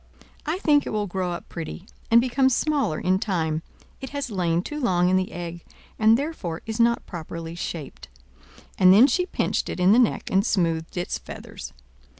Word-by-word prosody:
I 315 +4 0
think 295 -6 +3
it - - -2
will 210 -1 -1
grow 185 -1 -2
up 175 - -6
pretty, 170 +2 -7 0.2
and 230 - +7
become 260 +2 +2
smaller 275 - 0
in 185 +1 +1
time; 160 -6 -1 0.4
it 265 - -6
has 280 -4 -4
lain 175 -3 0
too 300 +6 -5
long 180 -9 +2
in 185 - +3
the 185 0 0
egg, 170 -1 -7 0.4
and 220 +1 +5
therefore 255 - -4
is 225 +1 -5
not 235 0 +3
properly 165 -1 -7
shaped." 165 - -6 0.7
And 185 -1 +7
then 210 +7 +8
she 360 +7 +1
pinched - - -1
it - - -5
in 180 +2 +5
the 230 - +6
neck, 240 - +1
and 195 +1 +3
smoothed 165 -6 -1
its 175 - -2
feathers. - - -9
190 Hz, 185 wpm, -24 LUFS, 175-245 Hz, 0.7 s, then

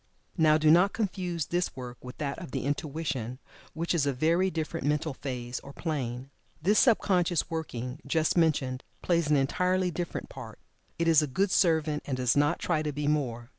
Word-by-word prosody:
Now, 155 -3 +5
do 155 0 +4
not 180 +4 +5
confuse 180 -6 -2
this 175 +1 -1
work 125 -1 -8
with 125 +1 -9
that 140 -1 -3
of 170 - -8
the - - -3
Intuition, 140 -4 -3 0.4
which 165 +2 -1
is 150 -4 +1
a 140 - +1
very 165 +8 +2
different 160 -5 -3
mental 150 +1 0
phase 125 -2 -5
or 140 - -12
plane. 135 -5 -4 0.3
This 200 +7 +3
sub 235 -5 +5
conscious 175 -3 +1
working, 125 -5 -4
just 155 +2 +1
mentioned, 140 -6 +1 0.2
plays 170 -3 +1
an 150 - +4
entirely 180 +6 +1
different 175 0 -4
part. - - -10 0.4
It 165 - 0
is 160 -2 +6
a 150 - -1
good 185 +9 0
servant, 160 -5 +2
and 135 -3 -2
does 125 -3 +2
not 145 +1 +3
try 160 -3 0
to 150 -1 -2
be 145 +1 -3
more. 125 -6 -1
155 Hz, 190 wpm, -28 LUFS, 135-170 Hz, 0.4 s, is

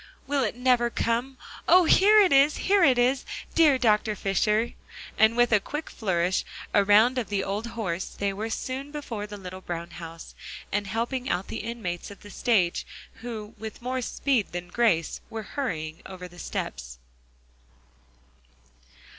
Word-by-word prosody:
"Will 280 -1 0
it 215 - -1
never 245 -1 +3
come 240 +3 -1 0.3
oh! 360 -1 +7
here 415 +6 +6
it 370 -7 +4
is, 280 +2 +5
here 395 -1 +3
it 260 -5 +5
is, 255 +2 +2 0.3
dear 305 -5 +5
Dr. 215 -3 +2
Fisher." 210 +4 +1 0.4
And 220 +2 +4
with 240 0 +4
a 215 - +5
quick 295 +10 -6
flourish 185 -3 0 0.3
around 210 +5 +5
of 230 - -4
the 200 -1 0
old 205 +4 -3
horse, 185 -4 -2
they 200 -1 -3
were 215 +3 -4
soon 260 +4 -4
before 235 -8 -5
the 205 0 -8
little 185 -1 -8
brown 170 -1 -5
house, 165 -1 -9 0.4
and 205 0 -1
helping 240 +5 -2
out 180 +2 -1
the - - -4
inmates 215 -6 -5
of 200 - -12
the 205 - -12
stage, 195 -8 +1 0.4
who 220 -3 -6
with 220 -1 -7
more 255 +1 -2
speed 250 -4 0
than 175 0 -5
grace 180 -7 +1
were 225 -1 -5
hurrying 160 - -3
over 185 -1 -8
the 175 0 -15
steps. - - -5
220 Hz, 160 wpm, -26 LUFS, 190-255 Hz, 0.4 s, oh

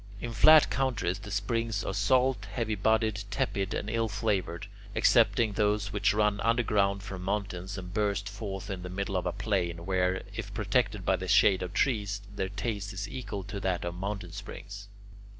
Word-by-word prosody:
In 120 +1 -5
flat 155 +8 +7
countries 120 -9 0
the 105 - -9
springs 105 +2 -1
are - - -3
salt, 130 -3 +2
heavy 110 -1 -1
bodied, 110 0 +1
tepid, 105 -6 -1
and - - -3
ill 115 +1 0
flavoured, 100 -5 -1 0.3
excepting 110 -3 +4
those 105 0 +1
which 105 - +3
run 105 -1 +2
underground 105 -4 +2
from 95 -2 -6
mountains, 100 -1 -3
and 90 -1 -7
burst 100 -1 0
forth 100 -2 -5
in 95 -2 -4
the 90 - -6
middle 100 +2 -3
of 90 - 0
a - - +1
plain, 85 -5 -2
where, 95 0 +1
if 100 -3 -5
protected 105 -2 0
by 95 - +3
the 95 +1 -5
shade 95 0 +5
of 90 -1 -4
trees, 105 -6 +1 0.2
their 95 -1 -2
taste 100 0 -3
is 100 +2 -4
equal 100 -4 -5
to 100 +1 -6
that 90 -2 -1
of 85 - -3
mountain 100 +3 -4
springs. 100 0 -8
100 Hz, 180 wpm, -29 LUFS, 95-110 Hz, 0.3 s, flat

